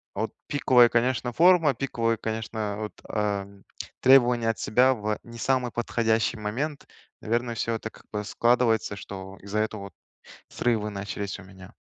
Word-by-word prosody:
а -, -, -2 dB
вот -, -, -2 dB, 0.2 s
пиковая, 125 Hz, -4 st, +5 dB
конечно, 120 Hz, +1 st, +1 dB
форма, 165 Hz, -3 st, +5 dB
пиковые, 115 Hz, -3 st, -1 dB
конечно, 110 Hz, -1 st, -3 dB
вот, 105 Hz, -1 st, -5 dB, 0.2 s
э, 100 Hz, -2 st, -1 dB, 0.6 s
требования 125 Hz, -3 st, +5 dB
от 115 Hz, -, -1 dB
себя 125 Hz, +4 st, +3 dB
в 105 Hz, -1 st, -3 dB
не 115 Hz, 0 st, -11 dB
самый 125 Hz, 0 st, 0 dB
подходящий 115 Hz, -1 st, 0 dB
момент, 130 Hz, +8 st, -4 dB, 0.3 s
наверное, 120 Hz, +2 st, -1 dB
всё 115 Hz, +2 st, -1 dB
это 110 Hz, 0 st, -6 dB
как -, -, -18 dB
бы 105 Hz, -1 st, -3 dB
складывается, 115 Hz, -2 st, +2 dB
что 95 Hz, 0 st, -9 dB
из-за 100 Hz, +1 st, -2 dB
этого 110 Hz, -1 st, -2 dB
вот 100 Hz, -, -10 dB, 0.6 s
срывы 110 Hz, -3 st, 0 dB
начались 100 Hz, 0 st, -5 dB
у -, -, -11 dB
меня. 95 Hz, -1 st, -14 dB
115 Hz, 155 wpm, -26 LUFS, 105-125 Hz, 0.6 s, пиковая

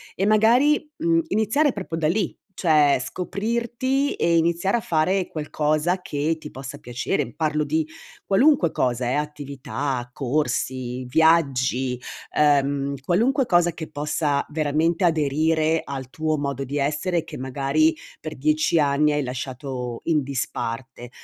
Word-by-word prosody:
e 195 Hz, -, 0 dB
magari, 240 Hz, +9 st, +4 dB
mhmm, 330 Hz, +1 st, +2 dB
iniziare 225 Hz, +7 st, +2 dB
proprio 185 Hz, -5 st, -5 dB
da 160 Hz, -2 st, +1 dB
lì, 180 Hz, +3 st, -1 dB, 0.2 s
cioè 150 Hz, -6 st, +3 dB
scoprirti 235 Hz, -, -1 dB
e 170 Hz, 0 st, +2 dB
iniziare 170 Hz, +6 st, +1 dB
a -, -, 0 dB
fare 180 Hz, +3 st, +1 dB
qualcosa 155 Hz, +3 st, -1 dB
che 150 Hz, +3 st, -1 dB
ti 150 Hz, -1 st, -9 dB
possa 135 Hz, 0 st, -8 dB
piacere. 120 Hz, -1 st, -2 dB
Parlo 155 Hz, -1 st, 0 dB
di 155 Hz, +1 st, 0 dB, 0.4 s
qualunque 250 Hz, -, +4 dB
cosa 125 Hz, -1 st, 0 dB
eh: -, -, 0 dB
attività, 140 Hz, -3 st, -3 dB
corsi, 130 Hz, -2 st, -2 dB
viaggi, 130 Hz, -4 st, +2 dB, 0.3 s
ehm, 140 Hz, -1 st, +2 dB
qualunque 245 Hz, -, +2 dB
cosa 175 Hz, -4 st, +3 dB
che 160 Hz, -1 st, -7 dB
possa 145 Hz, -1 st, -1 dB
veramente 155 Hz, +4 st, 0 dB
aderire 160 Hz, +1 st, +2 dB
al 135 Hz, -2 st, -6 dB
tuo 155 Hz, -1 st, -1 dB
modo 140 Hz, -1 st, -2 dB
di 140 Hz, +2 st, -4 dB
essere 155 Hz, +4 st, 0 dB
che -, -, -9 dB
magari 140 Hz, +4 st, +1 dB, 0.3 s
per 155 Hz, -3 st, -7 dB
10 155 Hz, +3 st, +2 dB
anni 150 Hz, +1 st, +3 dB
hai 145 Hz, 0 st, 0 dB
lasciato 125 Hz, -1 st, -5 dB
in 155 Hz, -3 st, +2 dB
disparte. 125 Hz, -2 st, -4 dB
155 Hz, 135 wpm, -23 LUFS, 140-175 Hz, 0.4 s, magari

